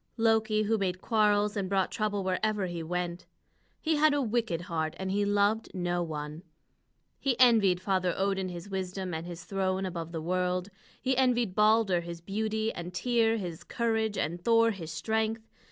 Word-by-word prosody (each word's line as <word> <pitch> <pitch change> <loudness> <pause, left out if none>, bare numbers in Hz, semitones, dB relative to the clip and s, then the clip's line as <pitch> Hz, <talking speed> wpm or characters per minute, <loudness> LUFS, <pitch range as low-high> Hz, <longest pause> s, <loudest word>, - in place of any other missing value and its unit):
Loki, 220 -1 +2
who 220 +1 +1
made 185 -2 -1
quarrels 210 -1 +2
and 195 -3 -2
brought 195 -1 +1
trouble 205 -2 -1
wherever 200 +2 0
he 175 -2 -4
went. 175 +1 -3 0.5
He 315 -1 +1
had 300 0 +4
a 290 - +1
wicked 225 -7 -1
heart, 160 -3 -2
and 190 0 -3
he 205 +1 +1
loved 205 +2 +2
no 175 -1 -1
one. 150 -1 -5 0.8
He 260 -3 0
envied 220 -8 +5
Father 185 -1 +1
Odin 195 -1 0
his 175 +1 -7
wisdom 190 -1 -4
and 160 +2 -4
his 175 -1 -7
throne 190 -1 -1
above 170 -3 -5
the 165 - -3
world. 180 +2 -1 0.3
He 260 0 0
envied 245 -6 +2
Balder 210 -3 +4
his 170 0 -7
beauty, 220 +4 -2
and 175 +1 -6
Tŷr 230 +3 +2
his 175 -6 -5
courage, 225 -3 -1
and 175 +4 -2
Thor 230 0 +4
his 170 -6 -7
strength. 220 +5 -1
195 Hz, 170 wpm, -29 LUFS, 180-220 Hz, 0.8 s, envied